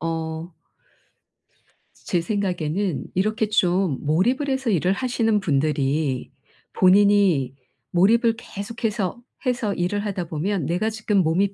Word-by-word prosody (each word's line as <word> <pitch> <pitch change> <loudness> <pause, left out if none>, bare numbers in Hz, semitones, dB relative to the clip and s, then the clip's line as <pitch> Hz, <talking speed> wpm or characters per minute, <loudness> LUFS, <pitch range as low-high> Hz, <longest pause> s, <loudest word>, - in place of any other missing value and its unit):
어. 165 +1 -4 1.5
제 175 -2 0
생각에는 185 -2 -1
이렇게 215 +2 0
좀 180 -6 +2
몰입을 235 - +1
해서 265 -2 -1
일을 185 -1 +2
하시는 225 -2 0
분들이 145 -3 0 0.4
본인이 185 -8 +4 0.4
몰입을 225 +6 +3
계속해서 220 -1 -4 0.3
해서 240 -5 0
일을 205 +4 -1
하다 190 -3 -3
보면 165 0 -2
'내가 180 +7 0
지금 215 -1 -1
몸이 190 +5 +1
190 Hz, 245 characters per minute, -23 LUFS, 165-215 Hz, 1.5 s, 본인이